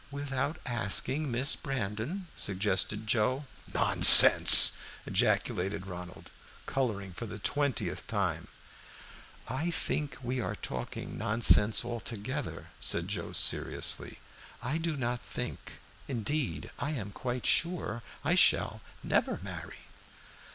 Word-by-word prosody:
"Without 140 Hz, +1 st, -5 dB
asking 125 Hz, +5 st, +1 dB
Miss 125 Hz, +4 st, +2 dB
Brandon?" 130 Hz, -, -6 dB
suggested 100 Hz, +1 st, -2 dB
Joe. 120 Hz, +6 st, -1 dB, 0.3 s
"Nonsense!" -, -, +9 dB, 0.3 s
ejaculated 95 Hz, +1 st, -2 dB
Ronald, 90 Hz, -1 st, -11 dB, 0.3 s
coloring 105 Hz, -8 st, -4 dB
for 115 Hz, +7 st, -8 dB
the 105 Hz, -, -9 dB
twentieth 140 Hz, +5 st, -4 dB
time. -, -, -4 dB, 1.0 s
"I 140 Hz, +8 st, -4 dB
think 150 Hz, -3 st, -4 dB
we 125 Hz, +1 st, -4 dB
are -, -, -5 dB
talking 65 Hz, -1 st, -8 dB
nonsense 110 Hz, -1 st, +1 dB
altogether," 120 Hz, +3 st, -6 dB
said 85 Hz, +2 st, -2 dB
Joe, 95 Hz, -5 st, -5 dB
seriously. -, -, -1 dB, 0.5 s
"I 145 Hz, +7 st, -3 dB
do 165 Hz, -2 st, -4 dB
not 120 Hz, -1 st, -4 dB
think, -, -, -8 dB, 0.3 s
indeed 120 Hz, -, -4 dB
I 150 Hz, +2 st, -4 dB
am 105 Hz, -8 st, -7 dB
quite 125 Hz, +3 st, -6 dB
sure, 165 Hz, -, 0 dB, 0.2 s
I 160 Hz, -, +1 dB
shall 185 Hz, -, +2 dB, 0.2 s
never -, -, -2 dB
marry." -, -, -10 dB
120 Hz, 110 wpm, -28 LUFS, 105-140 Hz, 1.0 s, Nonsense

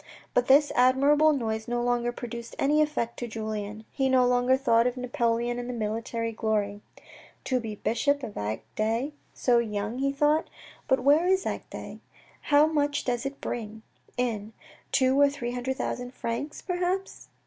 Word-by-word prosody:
But 245 Hz, -, +2 dB
this 290 Hz, +2 st, +5 dB
admirable 280 Hz, +5 st, +5 dB
noise 220 Hz, -6 st, -2 dB
no 240 Hz, 0 st, -1 dB
longer 240 Hz, 0 st, +1 dB
produced 235 Hz, -1 st, -7 dB
any 300 Hz, +2 st, +3 dB
effect 295 Hz, -7 st, -1 dB
on 240 Hz, -, -3 dB
Julien. 215 Hz, -1 st, -5 dB
He 270 Hz, -1 st, 0 dB
no 255 Hz, -1 st, +4 dB
longer 245 Hz, +1 st, +3 dB
thought 235 Hz, -3 st, +3 dB
of 250 Hz, +1 st, -3 dB
Napoleon 240 Hz, -2 st, 0 dB
and 245 Hz, 0 st, -4 dB
military 230 Hz, +1 st, -2 dB
glory. 210 Hz, -2 st, -1 dB, 0.3 s
" -, -, -21 dB
To 255 Hz, -1 st, 0 dB
be 220 Hz, -3 st, -5 dB
bishop 275 Hz, +7 st, 0 dB
of 210 Hz, -, -5 dB
Agde 220 Hz, -, -2 dB, 0.2 s
so 240 Hz, -2 st, +3 dB
young," 215 Hz, +1 st, -3 dB
he 275 Hz, +1 st, +1 dB
thought. 295 Hz, +3 st, +2 dB, 0.2 s
" -, -, -22 dB
But 265 Hz, -1 st, +2 dB
where 300 Hz, +6 st, +5 dB
is 380 Hz, 0 st, +2 dB
Agde? -, -, -6 dB, 0.4 s
How 290 Hz, +1 st, +5 dB
much 290 Hz, -2 st, 0 dB
does 245 Hz, +1 st, -1 dB
it 275 Hz, 0 st, -8 dB
bring 220 Hz, -1 st, -5 dB, 0.3 s
in? 225 Hz, -3 st, -2 dB, 0.4 s
Two 260 Hz, +1 st, +3 dB
or 285 Hz, -, +6 dB
three 245 Hz, -4 st, -4 dB
hundred 250 Hz, +2 st, -3 dB
thousand 245 Hz, +1 st, -4 dB
francs, 235 Hz, +6 st, -4 dB
perhaps." 365 Hz, +1 st, -2 dB
245 Hz, 165 wpm, -27 LUFS, 230-280 Hz, 0.4 s, or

